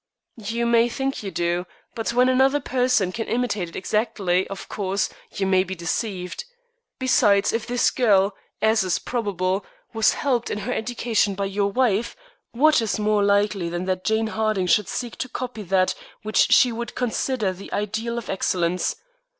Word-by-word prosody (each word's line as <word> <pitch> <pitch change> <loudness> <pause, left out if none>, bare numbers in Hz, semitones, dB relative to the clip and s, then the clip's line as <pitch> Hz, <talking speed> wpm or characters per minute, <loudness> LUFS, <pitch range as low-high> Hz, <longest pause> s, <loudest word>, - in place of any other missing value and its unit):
"You 230 +3 -1
may 235 0 +4
think 270 +2 -2
you 200 - -4
do, 175 0 -1 0.3
but 225 -2 -2
when 250 +2 +4
another 265 +2 +3
person 250 -8 +1
can 225 +4 -4
imitate 215 -7 -1
it - - -14
exactly, 190 -3 0
of 195 - -8
course, 195 -1 -1 0.2
you 195 - -2
may 190 -1 +3
be 190 0 -6
deceived. 180 +2 -3 0.5
Besides, 220 -6 +3
if 225 -1 -2
this 245 0 +2
girl, 205 -5 +3 0.3
as 220 -1 +4
is 185 - +1
probable, 200 -5 -2 0.3
was 220 -1 +3
helped 250 -5 0
in - - -2
her 215 +4 -3
education 225 -3 0
by 200 +1 -2
your 200 +1 0
wife, 235 -1 +1 0.4
what 300 +2 +4
is 225 - -1
more 210 -1 +2
likely 200 -3 +2
than 175 +1 -3
that 185 -1 -2
Jane 220 +2 +1
Harding 215 -4 0
should 195 +3 +3
seek 240 -2 -4
to 255 - -4
copy 250 -3 -5
that 185 -1 +2 0.3
which 215 0 +2
she 250 - +6
would 235 +1 -5
consider 240 -4 -1
the 190 +2 -11
ideal 220 +3 -2
of 235 - -5
excellence. 180 -2 0
210 Hz, 170 wpm, -23 LUFS, 190-235 Hz, 0.5 s, she